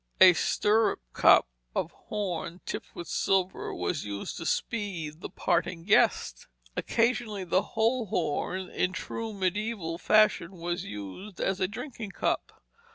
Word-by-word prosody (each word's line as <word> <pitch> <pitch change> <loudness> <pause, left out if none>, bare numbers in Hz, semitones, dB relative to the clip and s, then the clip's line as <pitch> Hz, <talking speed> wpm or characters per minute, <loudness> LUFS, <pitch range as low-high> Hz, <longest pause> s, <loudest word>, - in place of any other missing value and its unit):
A 185 -1 +10
stirrup 215 +5 +2
cup - - +6 0.3
of - - -1
horn, 180 -4 -4
tipped - - -6
with 175 - -6
silver, 190 -1 0
was 155 -5 -2
used 100 -1 -5
to 165 - -4
"speed 175 -9 -2
the - - -5
parting 175 -2 0
guest." 200 +4 +2 0.3
Occasionally 230 -4 0
the 185 +1 +2 0.2
whole 230 +1 +2
horn, 185 +3 -1
in 180 +1 -1
true 225 +5 -4
mediæval 195 -3 -2
fashion, 215 -4 +4
was 175 0 -3
used 105 - -8
as 190 0 0
a 185 - +2
drinking 220 -1 -7
cup. - - -2
190 Hz, 135 wpm, -29 LUFS, 170-215 Hz, 0.3 s, A